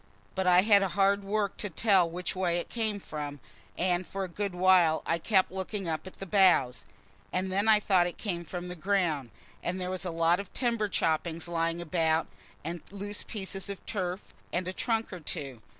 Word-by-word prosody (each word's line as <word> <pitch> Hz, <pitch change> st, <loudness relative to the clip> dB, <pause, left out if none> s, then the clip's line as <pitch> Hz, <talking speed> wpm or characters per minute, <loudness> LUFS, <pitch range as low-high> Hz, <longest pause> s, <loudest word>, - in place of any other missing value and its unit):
But 190 Hz, -1 st, -1 dB
I 180 Hz, 0 st, +6 dB
had 205 Hz, -1 st, +6 dB
hard 195 Hz, +1 st, +2 dB
work 200 Hz, 0 st, -1 dB
to 205 Hz, -, -3 dB
tell 190 Hz, -1 st, +3 dB
which 180 Hz, +3 st, -4 dB
way 180 Hz, -2 st, +1 dB
it 175 Hz, -, -4 dB
came 220 Hz, -3 st, -1 dB
from, 145 Hz, -5 st, -6 dB, 0.4 s
and 180 Hz, 0 st, +1 dB
for 195 Hz, 0 st, -4 dB
a -, -, -3 dB
good 195 Hz, +1 st, -4 dB
while 180 Hz, -3 st, +4 dB
I 165 Hz, -, 0 dB
kept 190 Hz, +1 st, +2 dB
looking 190 Hz, 0 st, -4 dB
up 160 Hz, +2 st, -3 dB
at 185 Hz, -, -9 dB
the 195 Hz, -, -8 dB
boughs. 180 Hz, -10 st, +3 dB, 0.5 s
And 185 Hz, +1 st, -1 dB
then 200 Hz, +3 st, +1 dB
I 215 Hz, -1 st, +7 dB
thought 185 Hz, -4 st, +3 dB
it 175 Hz, -, -6 dB
came 175 Hz, -5 st, -3 dB
from 175 Hz, +2 st, -6 dB
the 180 Hz, -, -5 dB
ground; 170 Hz, -7 st, 0 dB, 0.3 s
and 180 Hz, +2 st, -2 dB
there 180 Hz, 0 st, -2 dB
was 185 Hz, -, -3 dB
a 180 Hz, -, -2 dB
lot 165 Hz, +1 st, +2 dB
of 200 Hz, -, -7 dB
timber 235 Hz, -4 st, 0 dB
choppings 165 Hz, -1 st, 0 dB
lying 165 Hz, 0 st, -1 dB
about, 165 Hz, -1 st, +1 dB, 0.4 s
and 170 Hz, +2 st, -4 dB
loose 205 Hz, +1 st, -4 dB
pieces 195 Hz, -2 st, -4 dB
of 200 Hz, -, -7 dB
turf, 185 Hz, -2 st, -2 dB, 0.3 s
and 180 Hz, +1 st, -1 dB
a 185 Hz, -, -3 dB
trunk 225 Hz, 0 st, -1 dB
or 180 Hz, -, -6 dB
two. 140 Hz, -7 st, -5 dB
185 Hz, 200 wpm, -29 LUFS, 170-200 Hz, 0.5 s, I